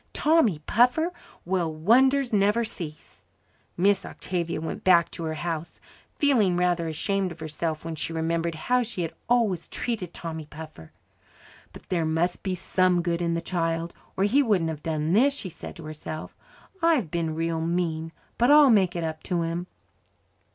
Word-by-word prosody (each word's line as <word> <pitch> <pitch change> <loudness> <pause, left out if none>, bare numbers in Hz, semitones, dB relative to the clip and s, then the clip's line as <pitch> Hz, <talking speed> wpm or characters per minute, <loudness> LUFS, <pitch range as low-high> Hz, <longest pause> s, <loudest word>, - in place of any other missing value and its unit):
"Tommy 300 - +3
Puffer! 250 +10 +3 0.3
Well, 175 -2 0
wonders 255 - +3
will 210 - +3
never 210 +4 +3
cease." 160 -8 -7 0.5
Miss 195 +2 +3
Octavia 170 -3 -3
went 160 - -5
back 170 -3 +5
to 165 - -5
her 160 0 -2
house 165 0 -4 0.4
feeling 225 -11 +3
rather 175 -2 +1
ashamed 190 +4 -1
of 170 - -10
herself 160 0 -3
when 165 - -3
she 160 +1 -3
remembered 165 +1 -1
how 250 +10 +1
she 230 -6 -3
had 165 - -4 0.2
always 220 -8 +2
treated 210 -8 -3
Tommy 160 -3 -6
Puffer. 155 - -11 0.8
"But - - -14
there 170 -3 +1
must 160 +3 0
be 190 -2 -2
some 180 -1 +1
good 170 0 -1
in 170 -1 0
the 170 - -1
child, 165 -1 -2 0.2
or 190 - +2
he 240 +8 +4
wouldn't 190 -10 +1
have 155 -2 -7
done 155 +1 -1
this," 275 +7 +4
she 195 - -3
said 170 - -9
to 165 - -10
herself. 155 0 -7 0.5
"I've 310 - +2
been 165 -2 -1
real 165 0 -1
mean, 165 -1 -1 0.3
but 240 +2 +4
I'll 295 -2 +8
make 190 -5 +3
it 170 - -2
up 160 -1 -4
to 175 -2 0
him." 170 +2 -3
175 Hz, 170 wpm, -26 LUFS, 160-205 Hz, 0.8 s, I'll